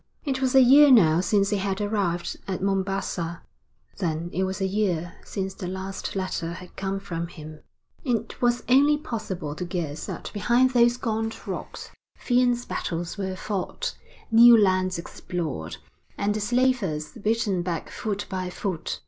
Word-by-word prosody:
It 265 -2 -1
was 260 0 +1
a 265 - +9
year 285 +4 +8
now 170 -11 +6
since 200 0 +2
he 205 - +2
had 195 0 -2
arrived 200 -5 -1
at 190 -2 -2
Mombassa, 195 -3 -2 0.6
then 170 -2 -2
it 190 - +1
was 190 +1 -3
a 195 - 0
year 185 -4 -1
since 190 -1 -4
the 180 - -6
last 190 +2 -5
letter 185 -3 -2
had 180 +1 -11
come 195 0 -2
from 170 -4 -4
him. 155 -2 -11 0.4
It 235 -5 -2
was 240 0 +2
only 285 +4 +5
possible 210 - -5
to 165 - -5
guess 165 -4 -4
that - - -6
behind 240 +5 +3
those 240 -1 +4
gaunt 225 -2 -3
rocks - - -6 0.3
fierce 245 -1 +2
battles 175 +3 -4
were 190 -1 -2
fought, 205 - -3 0.4
new 235 +1 +9
lands 185 -3 +2
explored, 170 - -5 0.4
and 205 +1 +1
the 215 - -2
slavers 210 -9 +1
beaten 220 -4 0
back 175 -2 -4
foot 205 -2 -3
by 185 -1 -3
foot. 180 -2 -4
195 Hz, 155 wpm, -25 LUFS, 180-230 Hz, 0.6 s, a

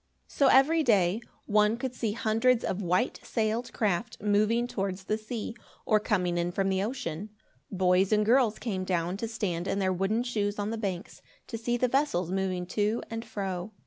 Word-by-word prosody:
So 280 - +2
every 300 +6 +5
day, 205 - +3 0.2
one 210 +1 +3
could 255 +1 -4
see 225 -4 -2
hundreds 230 +2 +2
of 190 - -2
white 180 +6 0
sailed 225 +1 -1
craft 215 +1 -1
moving 215 +3 +2
towards 195 -5 -3
the 215 - 0
sea, 220 +1 -5 0.3
or 215 -2 +4
coming 180 -5 0
in 175 +1 -1
from 195 +2 0
the 190 0 +1
ocean. 205 -5 -4 0.4
Boys 185 0 +2
and 210 0 +3
girls 235 -1 +3
came 195 -6 -3
down 180 -1 -1
to 230 - -3
stand 185 -6 -3
in 195 - 0
their 190 -1 +1
wooden 195 +6 0
shoes 210 -4 -1
on 205 +1 -2
the 230 - -3
banks, 195 +1 -4 0.2
to 230 - -7
see 240 +2 -1
the 250 - +2
vessels 240 - 0
moving 185 -2 -1
to 210 +5 -1
and 225 0 -4
fro. 200 -3 -4
210 Hz, 185 wpm, -28 LUFS, 190-230 Hz, 0.4 s, every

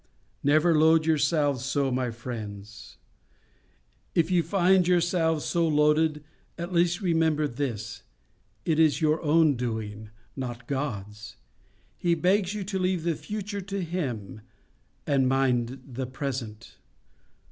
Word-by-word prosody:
Never 155 +4 +4
load 160 +1 +5
yourselves 145 -4 +1
so, 140 0 0
my 125 0 0
friends. 105 -3 -8 1.2
If 170 +1 +2
you 180 -2 +4
find 180 +1 +3
yourselves 170 -3 +2
so 170 -1 +1
loaded, 150 0 +2 0.3
at 175 +2 -5
least 175 +1 +2
remember 160 -4 +2
this: 120 -4 -4 0.6
it 160 -2 +1
is 155 -2 +4
your 155 -1 +1
own 155 -1 +4
doing, 110 -3 -4 0.3
not 125 -2 -6
God's. 105 -7 -5 0.6
He 170 -1 +1
begs 190 +4 +1
you 210 - -3
to 190 0 -3
leave 185 -2 0
the 170 0 +1
future 205 +4 -5
to 195 0 -4
Him, 130 - -4 0.6
and 135 -2 +2
mind 130 -1 +1
the 130 0 -5
present. 125 -4 -6
150 Hz, 125 wpm, -27 LUFS, 125-170 Hz, 1.2 s, load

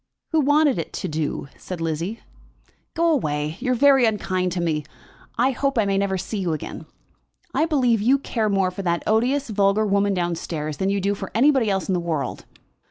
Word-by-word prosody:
"Who 320 - +3
wanted 290 - +3
it 165 - -5
to - - -3
do?" 155 -3 -3
said 180 -2 -6
Lizzie. 165 +7 -3 0.7
"Go 335 0 +3
away. 150 - -1
You 255 0 0
are - - +1
very 270 0 +5
unkind 185 -4 0
to 180 - -2
me. 160 -3 0 0.5
I 250 +4 +3
hope 275 0 -1
I 220 - +3
may 195 -1 +1
never 195 -1 0
see 195 +3 -4
you 175 -4 -1
again. 155 - -6 0.7
I 310 +4 +2
believe 250 -8 +2
you 255 +6 +4
care 225 -5 -1
more 195 -2 +1
for 185 - -6
that 170 -2 -1
odious 245 +4 +1
vulgar 200 +1 +2
woman 200 0 +2
down 175 -1 0
stairs 155 -2 -4
than 190 - 0
you 200 0 +1
do 200 +1 0
for 200 - -6
anybody 260 -2 +4
else 195 -1 -1
in 190 - 0
the 180 - +1
world." 160 -7 -3
200 Hz, 205 wpm, -23 LUFS, 175-250 Hz, 0.7 s, very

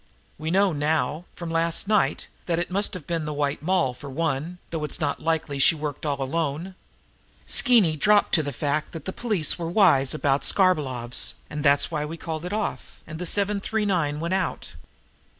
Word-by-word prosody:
We 155 +1 -3
know 190 +1 +3
now, 150 +1 0
from 170 -2 -6
last 165 +3 0
night, 200 -10 +1 0.2
that 170 -2 +1
it 175 +1 -2
must 200 +1 0
have 170 -6 -8
been 165 -2 -2
the 150 - -3
White 145 0 -1
Moll, 175 -6 +1
for 140 +3 -10
one, 155 +3 -2
though 160 -2 -3
it's 150 - -1
not 145 -3 -1
likely 160 -3 -1
she 150 - +5
worked 150 -1 -4
all 140 -1 -1
alone. 160 +5 -2 0.7
Skeeny 225 - +4
dropped 210 +5 +3
to 160 - +5
the 145 -1 -4
fact 145 +3 -2
that 165 -3 -7
the 190 - -4
police 210 -9 0
were 165 -1 -3
wise 165 -9 +4
about 140 -2 +1
Skarbolov's, 135 -11 +1 0.2
and 150 -1 -4
that's 140 +2 +3
why 150 -2 -1
we 160 +2 -6
called 160 0 -5
it 180 - -4
off, 215 0 -4
and 160 0 -8
the 180 - -3
'seven 200 +2 +1
three 215 +2 -1
nine' 160 -7 0
went 170 +3 -2
out. 190 -2 -2
160 Hz, 195 wpm, -25 LUFS, 145-180 Hz, 0.7 s, she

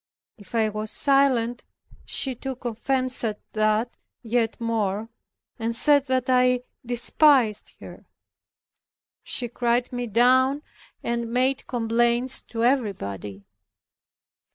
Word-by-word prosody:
If 205 -1 -12
I 220 -1 +2
was 215 +1 -5
silent, 260 -4 +1 0.4
she 265 - +1
took 260 +1 -7
offence 255 +3 0
at 215 -2 -2
that 215 +2 0 0.3
yet 230 -1 -1
more, 220 -2 -2 0.5
and 230 0 -2
said 285 +3 +4
that 255 -1 0
I 250 -1 +3 0.2
despised 245 -1 +2
her. - - -12 1.1
She 245 - -2
cried 240 +1 -1
me 245 0 -3
down, 260 +5 +3 0.4
and 235 -1 -3
made 255 +2 0
complaints 240 +2 +1
to 230 -1 -4
everybody. 105 - -2
240 Hz, 105 wpm, -24 LUFS, 225-255 Hz, 1.1 s, said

